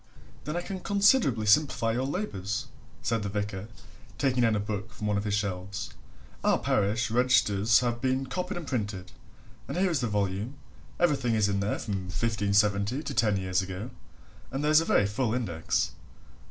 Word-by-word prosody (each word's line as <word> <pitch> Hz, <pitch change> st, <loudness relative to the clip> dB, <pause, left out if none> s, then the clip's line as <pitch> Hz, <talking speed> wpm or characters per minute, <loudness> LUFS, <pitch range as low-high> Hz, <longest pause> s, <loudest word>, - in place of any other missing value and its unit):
"Then 150 Hz, +3 st, -2 dB
I 175 Hz, -, -2 dB
can 190 Hz, 0 st, -5 dB
considerably 200 Hz, -, +3 dB
simplify 115 Hz, 0 st, +3 dB
your 125 Hz, +3 st, -1 dB
labours," 105 Hz, -, -3 dB, 0.4 s
said 115 Hz, -2 st, 0 dB
the 100 Hz, -, -3 dB
vicar, 100 Hz, -1 st, -3 dB, 0.5 s
taking 130 Hz, -3 st, +1 dB
down 115 Hz, -2 st, +3 dB
a -, -, +1 dB
book 105 Hz, 0 st, -4 dB
from 105 Hz, 0 st, -7 dB
one 105 Hz, -1 st, +1 dB
of 100 Hz, +1 st, -1 dB
his 105 Hz, -1 st, +1 dB
shelves. 100 Hz, -1 st, -3 dB, 0.5 s
"Our -, -, +4 dB
parish 110 Hz, +4 st, 0 dB
registers 115 Hz, -3 st, +4 dB
have 120 Hz, -1 st, -1 dB
been 130 Hz, 0 st, +1 dB
copied 180 Hz, +9 st, -3 dB
and 175 Hz, -, -5 dB
printed, 100 Hz, -8 st, -3 dB, 0.6 s
and 140 Hz, -, -4 dB
here 185 Hz, 0 st, +2 dB
is 160 Hz, -, +1 dB
the 120 Hz, -, 0 dB
volume 105 Hz, +4 st, -1 dB, 0.4 s
everything 135 Hz, -9 st, +2 dB
is 105 Hz, -2 st, +3 dB
in 100 Hz, -1 st, 0 dB
there 100 Hz, +1 st, 0 dB
from 100 Hz, -3 st, -3 dB
1570 105 Hz, +4 st, +1 dB
to 145 Hz, -, -4 dB
ten 105 Hz, -5 st, +2 dB
years 95 Hz, -1 st, 0 dB
ago, 95 Hz, +5 st, -6 dB, 0.6 s
and 135 Hz, +2 st, -3 dB
there 150 Hz, -, +2 dB
is 155 Hz, +1 st, +7 dB
a -, -, -2 dB
very 100 Hz, -, +3 dB
full 110 Hz, +3 st, 0 dB
index. 90 Hz, -10 st, -1 dB
110 Hz, 180 wpm, -28 LUFS, 100-130 Hz, 0.6 s, is